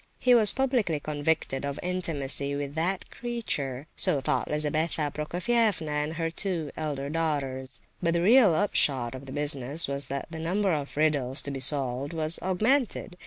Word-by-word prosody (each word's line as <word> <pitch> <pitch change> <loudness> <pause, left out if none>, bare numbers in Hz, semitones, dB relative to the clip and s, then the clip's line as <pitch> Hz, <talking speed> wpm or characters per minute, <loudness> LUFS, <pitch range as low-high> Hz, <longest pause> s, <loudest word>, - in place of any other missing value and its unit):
He 250 - +3
was 220 -4 +7
publicly 250 - 0
convicted 145 -2 -2
of 140 0 -4
intimacy 145 -6 -2
with 140 0 -4
"that 175 +5 -2
creature." 150 - -4
So 175 -5 +4
thought 135 - -1
Lizabetha 150 0 -1
Prokofievna 180 +2 -1
and 150 +1 -2
her 165 0 -3
two 170 -4 -2
elder 145 -3 -4
daughters. 140 -5 -2 0.2
But 170 -1 +1
the 170 - +1
real 215 -4 +5
upshot 135 -11 +1
of 130 +1 -9
the - - -8
business 145 +1 +3
was 140 0 -1
that 140 0 -4
the 160 - -6
number 190 +4 0
of 145 -3 -4
riddles 145 -4 +2
to 140 - -4
be 135 - -5
solved 135 +1 +2
was 160 0 0
augmented. 215 +2 0
155 Hz, 165 wpm, -27 LUFS, 140-180 Hz, 0.2 s, was